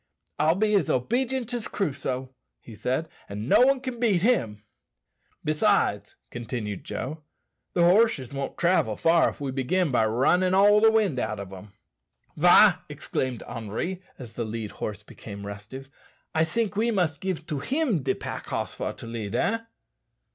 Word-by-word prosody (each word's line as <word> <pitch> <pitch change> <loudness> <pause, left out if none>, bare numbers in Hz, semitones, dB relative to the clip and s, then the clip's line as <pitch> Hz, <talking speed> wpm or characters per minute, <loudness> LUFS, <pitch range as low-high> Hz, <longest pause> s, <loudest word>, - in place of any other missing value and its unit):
"I'll 160 +2 +3
be 210 +2 +1
as 195 -8 +2
obedient 245 - 0
as 240 -3 -3
Crusoe," 130 -7 -3 0.3
he 115 - -13
said, 130 +9 -2 0.2
"and 105 +3 -5
no - - +5
one 270 +1 +5
can 255 -2 -6
beat 205 -7 +2
him." 110 - +1 0.8
"Besides," 155 - +1 0.2
continued 115 -4 -5
Joe, 155 +4 -5 0.5
"the 175 - +3
horses 175 - +3
won't 135 -1 -4
travel 170 - +2
far 165 0 +4
if - - -11
we 140 -2 -3
begin 140 +6 0
by 115 -3 +3
runnin' 180 +11 +2
all 205 +2 +6
the 225 - +7
wind 210 - +2
out 110 -3 -2
o' 100 - -5
them." 95 +1 -12 0.6
"Wah!" - - +7
exclaimed 130 -3 -3
Henri, 115 - -4 0.2
as 120 -4 -10
the 120 - -3
led 110 -1 -5
horse 105 -1 -5
became 100 -1 -10
restive; 105 +7 -8 0.5
"I 160 0 +3
think 215 +3 -1
we 225 +3 +1
must 175 -9 0
give 185 -4 -3
to 150 -4 -3
him 255 - 0
de 130 0 0
pack - - -6
hoss - - -3
for - - -4
to - - -11
lead, 115 -3 -5
eh?" 225 +2 +1
150 Hz, 165 wpm, -26 LUFS, -, 0.8 s, the